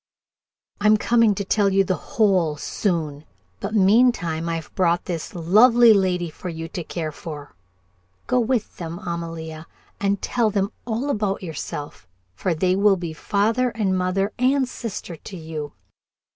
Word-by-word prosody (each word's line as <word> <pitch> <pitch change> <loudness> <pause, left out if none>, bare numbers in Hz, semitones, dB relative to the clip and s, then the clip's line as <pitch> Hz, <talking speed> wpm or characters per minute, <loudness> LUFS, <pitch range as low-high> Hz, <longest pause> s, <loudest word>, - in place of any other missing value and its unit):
"I'm 210 +1 +5
coming 230 -1 +3
to 200 - -3
tell 200 0 +2
you 195 0 +3
the 185 - 0
whole, 185 -7 +1
soon, 155 -4 -2 0.4
but 200 +2 -4
meantime 195 -6 +3
I've 165 -2 -4
brought 175 -1 +1
this 170 -1 -5
lovely 230 +8 +6
young 205 -3 +6
lady 180 -2 0
for 175 +3 -7
you 165 -1 -5
to 175 - -5
care 160 -1 -4
for. 150 -2 -9 0.7
Go 250 - +2
with 240 -2 -1
them, 170 -2 -5
Amalia, 165 -2 -6 0.3
and 200 0 +1
tell 235 -3 +1
them 200 0 0 0.2
all 245 +5 -1
about 205 -5 -1
yourself, 145 - -6 0.3
for 170 - -1
they 185 +3 +2
will 200 0 +4
be 170 -2 -5
father 220 +8 +1
and 210 -5 -1
mother 185 +2 0
and 260 +1 +3
sister 210 -8 -6
to 185 +5 -9
you. 155 -3 -6
190 Hz, 155 wpm, -23 LUFS, 165-215 Hz, 0.7 s, lovely